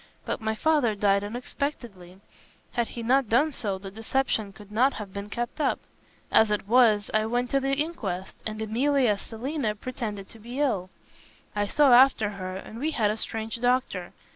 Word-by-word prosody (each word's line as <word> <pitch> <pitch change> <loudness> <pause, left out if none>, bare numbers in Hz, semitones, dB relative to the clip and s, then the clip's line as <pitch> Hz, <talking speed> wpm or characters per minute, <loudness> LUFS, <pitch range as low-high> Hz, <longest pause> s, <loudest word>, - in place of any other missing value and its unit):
But - - -3
my 220 0 -1
father 280 -4 +2
died 200 -1 +2
unexpectedly. 220 -5 -5 0.5
Had 235 -2 0
he 235 - -7
not 255 0 +3
done 290 +7 +3
so, 205 -8 -2
the 195 0 -9
deception 220 -1 -1
could 205 +1 -15
not 250 +5 +3
have 200 -3 -7
been 200 0 -6
kept 240 +7 -3
up. - - +2 0.5
As 220 - +5
it 210 -1 -1
was, 220 -3 +4
I 215 0 +2
went 245 +1 -1
to 275 - +3
the 270 0 0
inquest, 210 - -3
and 215 0 -4
Emilia 250 +3 +2
as 200 - -2
Selina 235 -1 -3
pretended 210 -4 -5
to 225 - -13
be 240 +5 -7
ill. 205 -11 0 0.7
I 205 0 0
saw 280 +3 +5
after 245 -4 +6
her 185 -2 -6
and 215 +4 -8
we 300 +4 0
had 210 -3 +3
a - - -2
strange 225 +1 -4
doctor. 245 -8 0
225 Hz, 185 wpm, -27 LUFS, 205-255 Hz, 0.7 s, after